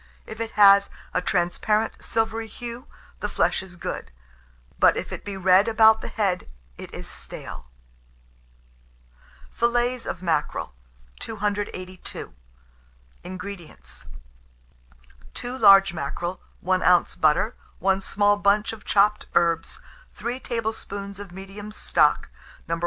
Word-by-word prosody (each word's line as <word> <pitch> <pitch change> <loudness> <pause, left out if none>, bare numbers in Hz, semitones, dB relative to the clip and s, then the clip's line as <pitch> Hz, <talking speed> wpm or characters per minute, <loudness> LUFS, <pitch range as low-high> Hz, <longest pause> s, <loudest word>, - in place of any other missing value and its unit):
If 220 - -9
it 225 -1 -4
have 200 -1 +7 0.2
a 180 - +1
transparent, 195 +5 0
silvery 225 0 -1
hue, 240 +4 -8 0.3
the - - -3
flesh - - +1
is 190 -2 -12
good; 170 - -5 0.7
but - - +5
if - - -4
it - - -6
be 200 -1 -6
red 190 +2 +5
about 220 -1 +5
the - - -5
head, 195 -5 -1 0.3
it - - -10
is - - -8
stale. - - -8 1.8
FILLETS 240 +1 0
OF 185 - -5
MACKEREL. 165 - -1 0.5
282. 205 - -4 0.9
INGREDIENTS. 180 - -9 1.3
2 245 +1 -4
large 195 -6 +7
mackerel, 175 +4 -4 0.2
1 185 +1 +1
oz. 180 -1 +4
butter, 160 +9 +2 0.2
1 195 0 +1
small 205 +1 +2
bunch 205 +2 +2
of 220 - -11
chopped 210 +1 +2
herbs, 165 -1 +1 0.3
3 240 +4 -4
tablespoonfuls 205 -4 -4
of 200 -3 -9
medium 195 +3 -9
stock, - - +2 0.4
No. 165 0 -1
200 Hz, 120 wpm, -24 LUFS, 180-220 Hz, 1.8 s, have